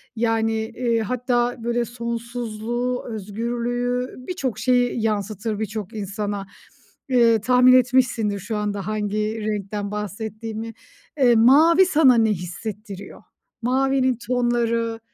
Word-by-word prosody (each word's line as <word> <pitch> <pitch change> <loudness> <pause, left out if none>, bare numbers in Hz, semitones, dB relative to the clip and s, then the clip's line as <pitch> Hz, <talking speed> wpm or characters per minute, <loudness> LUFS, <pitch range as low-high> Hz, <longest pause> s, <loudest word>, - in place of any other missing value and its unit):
yani, 225 -1 +1
eee, 230 +1 -1
hatta 245 +1 0
böyle 235 0 0
sonsuzluğu, 235 +1 -4
özgürlüğü, 240 +4 -3
birçok 270 - -3
şeyi 245 -2 +2
yansıtır 215 0 -2
birçok 215 0 -4
insana. 205 0 -4 0.6
Eee, 235 -4 +4
tahmin 250 +2 +5
etmişsindir 245 -5 +2
şu 215 +3 -4
anda 205 -1 -3
hangi 215 +1 -2
renkten 205 -1 -3
bahsettiğimi. 220 +2 -5 0.5
Eee, 245 -3 +5
mavi 310 +11 +6
sana 305 -8 +5
ne 225 -1 +3
hissettiriyor? 200 +2 -7 0.4
Mavinin 260 0 +1
tonları 235 -2 0
230 Hz, 105 wpm, -22 LUFS, 215-245 Hz, 0.6 s, mavi